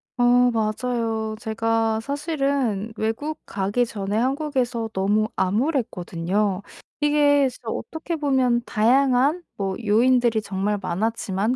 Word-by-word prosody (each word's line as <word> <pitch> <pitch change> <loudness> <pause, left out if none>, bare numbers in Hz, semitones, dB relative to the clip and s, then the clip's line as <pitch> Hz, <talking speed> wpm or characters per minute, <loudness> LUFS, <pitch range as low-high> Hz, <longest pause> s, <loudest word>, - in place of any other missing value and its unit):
어 245 - +1 0.3
맞아요. 225 0 -1
제가 225 0 0
사실은 275 - -1
외국 225 +8 -2
가기 205 +5 0
전에 205 -2 -3
한국에서 255 -3 -1
너무 205 +3 +1
암울했거든요. 200 - -1 0.4
이게 290 -1 +4
진짜 240 -2 -9
어떻게 320 +7 -4
보면 260 -5 +1
다양한 265 +8 +3
뭐 195 -1 -2
요인들이 235 +1 +3
정말 200 +1 -2
많았지만 215 +2 -1
225 Hz, 260 characters per minute, -23 LUFS, 210-270 Hz, 0.4 s, 이게